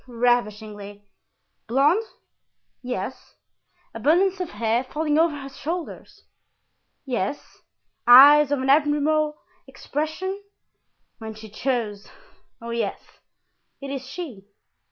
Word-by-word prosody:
"Ravishingly." 215 -4 -2 0.6
"Blond?" 280 - +3 0.8
"Yes." 250 0 -6 0.6
"Abundance 350 - +2
of 360 -3 -3
hair—falling 260 +7 -1
over 325 -2 +2
her 275 -1 -8
shoulders?" 325 +5 -7 0.8
"Yes." 250 0 -4 0.5
"Eyes 285 +4 +9
of 275 -2 0
an 265 - -1
admirable 300 +1 +2 0.3
expression?" 315 +8 -4 0.8
"When 220 -1 -7
she 215 -1 -12
chose. 215 -4 -3 0.5
Oh, 235 0 -7
yes, 235 0 -2 0.8
it 275 -1 -7
is 265 -2 -6
she!" 265 - -8
270 Hz, 95 wpm, -24 LUFS, 230-305 Hz, 0.8 s, Eyes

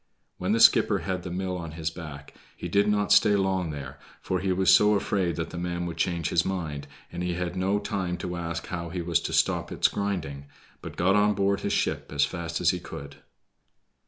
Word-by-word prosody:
When 95 +2 -1
the 115 - +2
skipper - - +6
had 95 -2 -2
the 90 - -6
mill 90 +1 -3
on 85 -2 -7
his 80 -1 -3
back 75 -5 -9 0.2
he - - -5
did 100 +4 +2
not 105 0 +3
long 105 - 0
stay 105 0 +6 0.4
there, 70 -1 -7 0.2
for 95 - -2
he 95 0 -1
was 95 0 +4
so 105 0 +6
afraid 95 -4 0
that 80 0 -4
the 85 - -5
man 85 0 -2
would 85 -1 -5
change 85 -2 0
his 85 0 +2
mind, 80 -7 -4 0.2
and 85 - -5
he 90 -1 -1
had 90 0 -3
no 95 +2 +1
time 95 -4 -2
to 90 0 -4
ask 85 -1 -4
how 85 -2 -5
he 90 0 -4
was 85 0 +2
to - - -4
stop - - +1
its - - +3
grinding, 80 -9 -3 0.3
but - - -9
got 95 +3 +3
on 105 0 +3
board 100 0 +1
his - - -2
ship - - -1
as 70 0 +3
fast 85 +1 -4
as - - +4
he - - -3
could. 70 0 -9
90 Hz, 220 wpm, -27 LUFS, 85-95 Hz, 0.4 s, skipper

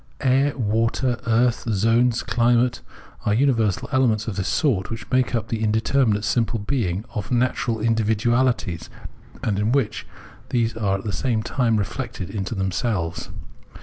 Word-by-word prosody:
Air, 135 +2 +2
water, 115 +2 0
earth, 115 +1 +2
zones 115 +3 +2
and - - -13
climate 120 +1 +2 0.4
are 105 - +1
uni 135 +3 +4
versal 110 -5 0
elements 120 -5 +2
of 110 - -3
this 95 -2 -2
sort, 110 -11 +1
which 115 +1 -6
make 130 -1 +2
up 115 -1 -2
the 115 -1 -2
indeter 110 +5 +2
minate 105 -1 +1
simple 115 +1 +1
being 105 -4 -2
of 105 -1 -4
natural 120 -2 0
individuaUties, 115 -4 +1 0.5
and 100 -3 0
in 105 +2 +1
which 130 -5 0 0.4
these 115 -2 0
are 100 -3 0
at 95 - -9
the 105 - -3
same 115 0 0
time 115 -3 +1
reflected 95 -3 -4
into 100 +1 -3
them 95 -1 -1
selves. 90 -6 -2
115 Hz, 160 wpm, -23 LUFS, 105-125 Hz, 0.5 s, uni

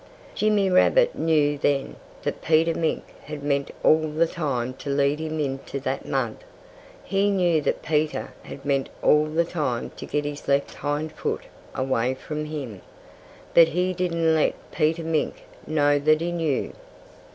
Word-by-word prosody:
Jimmy 210 -2 +2
Rabbit - - +4
knew 150 -3 +2
then 140 -1 0 0.3
that - - -3
Peter 165 +1 +3
Mink 160 -1 -1 0.2
had 150 -1 -7
meant 140 -1 0
all 155 0 +4
the 155 +2 +2
time 130 -7 -2
to 145 - -6
lead 140 +1 +2
him 160 0 -3
into 135 -1 -3
that 135 0 -3
mud. 125 -5 -1 0.7
He 195 +2 +1
knew 175 -5 +2
that - - -1
Peter 155 0 -1
had 135 - -10
meant 140 -1 0
all 150 0 +5
the 160 +2 +1
time 145 -9 -2
to - - -7
get 150 0 -1
his 145 0 -6
left 140 0 +1
hind 150 +2 -2
foot - - -3 0.3
away 130 -1 0
from 150 +3 -5
him. 135 -10 -6 0.7
But 165 -1 +8
he 180 +2 0
didn't 170 -2 +1
let 155 - +2 0.2
Peter 160 +2 +1
Mink 160 -1 -1 0.2
know 145 -2 +3
that 155 +2 +4
he 170 +1 -2
knew. 160 -5 -1
150 Hz, 160 wpm, -25 LUFS, 140-165 Hz, 0.7 s, But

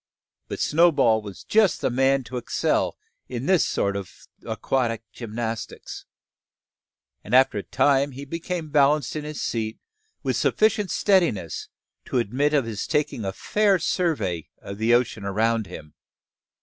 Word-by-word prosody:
But - - -5
Snowball 150 -9 +4
was 100 -3 -10
just 210 -5 +3
the - - 0
man 135 +2 +2
to 125 +1 -6
excel 120 - 0 0.3
in 125 +1 -4
this 185 -1 +4
sort 100 0 0
of 100 -3 -8 0.2
aquatic 115 -4 -1
gymnastics; 115 -1 -6 1.2
and 110 - 0
after 130 -5 +5
a - - -6
time 140 0 +2
he 140 +2 -8
became 165 +1 -4
balanced 145 -1 +3
in 150 -1 -4
his 150 0 -6
seat 110 -1 -2 0.5
with - - 0
sufficient 215 -2 +2
steadiness 170 - +1 0.4
to - - -2
admit 135 +6 +1
of 140 -5 +2
his 110 -3 -4
taking 150 -6 -1
a 95 - -2
fair 205 - +2
survey 155 - -1
of 100 +1 -8
the 110 +2 +2
ocean 120 -3 +2
around 110 +2 0
him. 75 -1 -10
130 Hz, 145 wpm, -24 LUFS, 110-155 Hz, 1.2 s, after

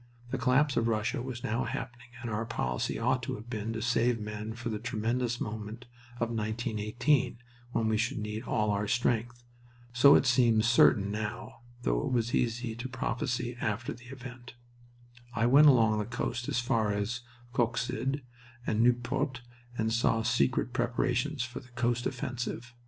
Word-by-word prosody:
The 135 - -1
collapse 135 +4 +3
of 115 - +2
Russia 110 +1 0
was 125 -2 -6
now 115 +4 0
happening 120 +1 -5 0.2
and 115 - -3
our 105 +1 -1
policy 65 - -2
ought 125 +3 +1
to 120 - -3
have 110 +3 -10
been 110 0 -3
to 110 -1 -3
save 120 0 +2
men 105 +1 -5
for 120 0 -4
the 105 -2 -3
tremendous 120 +2 -1
moment 110 +3 -5 0.3
of 115 -1 -2
1918, 115 +4 0 0.4
when 110 - +1
we 110 0 +2
should 115 +2 0
need 105 0 -3
all 105 -4 0
our 105 +1 0
strength. 120 +1 0 0.5
So 140 +3 +8
it - - +4
seems 120 -3 +4
certain 105 -4 +5
now, 105 +2 -5 0.2
though - - 0
it 125 - +3
is 115 +1 -1
easy 120 -1 0
to 120 +2 -5
prophesy 125 -1 -2
after 110 +3 -1
the 120 +1 -15
event. 125 -1 -10 0.8
I 115 - +2
went 140 +5 +7
along 110 -6 +5
the 105 - -1
coast 120 +2 -3
as - - 0
far 115 -4 +1
as 105 +4 -2 0.3
Coxyde 125 +3 0 0.4
and 110 0 +1
Nieuport 125 +3 +1 0.4
and 110 0 0
saw 115 -1 +2
secret 125 +1 +1
preparations 125 +3 0
for 130 -1 -6
the 125 - -16
coast 120 0 +1
offensive. 125 -2 -4
120 Hz, 165 wpm, -30 LUFS, 110-125 Hz, 0.8 s, So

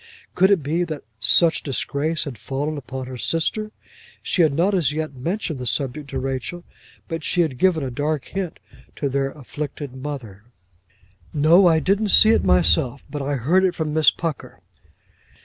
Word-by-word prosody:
Could 190 +2 +4
it 195 -7 +3
be 160 +5 0
that 155 -4 -6 0.2
such 165 +7 +5
disgrace 150 +3 -2
had 140 -4 -6
fallen 140 +7 -3
upon 130 -2 -6
her 130 -1 -8
sister! 215 - -1 0.5
She 180 - +1
had 160 -3 +4
not 175 +8 +1
as 165 -8 +2
yet 155 -1 -3
mentioned 160 +3 -3
the 125 - -4
subject 140 +4 -2
to - - -4
Rachel, 135 +6 -4 0.4
but 165 -3 -5
she 175 - +1
had 140 -7 -1
given 180 -5 +3
a 130 - -3
dark 145 +3 -2
hint 190 -4 -4 0.4
to 140 - -2
their 135 0 0
afflicted 145 0 -7
mother. 130 -7 -7 0.9
"No, 165 +6 +6
I 160 -2 +4
didn't 200 +5 +1
see 215 +3 +7
it - - +3
myself, 90 +8 +2
but 145 - -4
I 140 +1 -1
heard 160 +10 +2
it 180 -2 +1
from 155 -3 -2
Miss 155 0 +5
Pucker." 165 -5 -5
150 Hz, 175 wpm, -22 LUFS, 135-170 Hz, 0.9 s, see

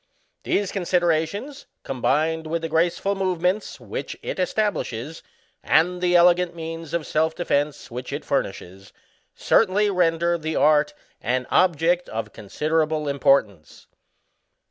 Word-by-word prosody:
These 200 -2 -1
considerations, 180 - -1 0.2
combined 155 +5 0
with 165 +1 -2
the - - -1
graceful 170 +5 +1
movements 185 +1 -1
which - - -6
it - - -4
establishes, 165 - -2 0.4
and 180 +2 +2
the 180 -1 +2
elegant 175 0 +4
means 165 -1 -6
of 165 -3 -2
self 160 +1 0
defence 145 -6 -1
which 125 +2 -6
it 145 - -5
furnishes, 95 -6 -4 0.4
certainly 205 0 +2
render 170 -1 +1
the 160 0 -3
art 150 0 +3 0.3
an 125 +2 -1
object 175 0 +2
of 115 +1 -5
considerable 155 +7 -1
im 140 0 -2
portance." 105 - +1
165 Hz, 120 wpm, -23 LUFS, 145-180 Hz, 0.4 s, elegant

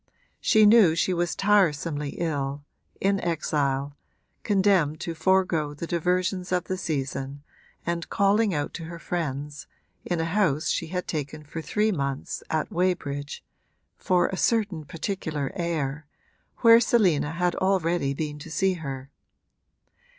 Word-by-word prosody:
She 215 -1 +5
knew 205 -6 +6
she 180 +2 +1
was 175 -1 -1
tiresomely 165 -7 +1
ill, 145 -4 -2 0.4
in 195 0 +2
exile, 145 -4 -1 0.5
condemned 190 -7 +2
to 170 - -3
forego 165 -4 +1
the 160 - -5
diversions 180 +2 -1
of 180 -1 +1
the 185 - -3
season 140 -4 -3 0.4
and 170 -1 -2
calling 200 +2 +3
out 145 -4 -2
to 165 - -6
her 170 +1 -7
friends, 150 -4 -4 0.4
in 175 -2 -2
a 165 - 0
house 165 -4 +1
she 165 - -1
had 180 +2 -4
taken 150 0 -4
for 160 +2 -6
three 215 +6 +1
months 140 -6 -3
at 155 -1 -1
Weybridge 150 -6 -2 0.5
(for 180 -1 +2
a 190 - -4
certain 200 -10 0
particular 155 -3 -3
air) 160 -4 -2 0.5
where 230 -1 +8
Selina 185 -11 +2
had 175 +1 +1
already 175 -7 +1
been 150 0 -4
to 155 - -10
see 190 +3 +1
her. 135 -2 -6
165 Hz, 135 wpm, -26 LUFS, 145-185 Hz, 0.5 s, where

